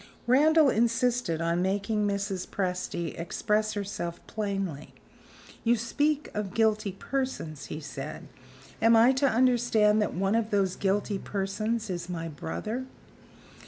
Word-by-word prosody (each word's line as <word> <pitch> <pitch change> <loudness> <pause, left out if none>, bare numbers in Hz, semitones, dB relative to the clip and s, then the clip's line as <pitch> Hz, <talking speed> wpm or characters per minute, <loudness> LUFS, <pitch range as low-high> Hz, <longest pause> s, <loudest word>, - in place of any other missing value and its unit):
Randal 295 +3 +5
insisted 235 -6 +1
on 170 +1 +1
making 205 +3 0
Mrs. 200 -2 -2
Presty 180 -3 -3
express 210 +5 0
herself 195 -4 -4
plainly. 195 -8 -4 0.7
"You 235 +1 +4
speak 290 +6 0
of 210 -2 -4
guilty 215 -3 +2
persons," 225 - -4
he 155 - -5
said. 150 - -7 0.5
"Am 225 +1 +6
I 230 +3 +7
to 270 +2 +2
understand 230 -3 +3
that 210 - -1
one 195 +3 +1
of 225 -1 +1
those 195 -3 +1
guilty 200 +1 0
persons 215 +4 -2
is 175 -1 -4
my 165 -2 -3
brother?" 215 - -4
210 Hz, 125 wpm, -28 LUFS, 185-230 Hz, 0.7 s, I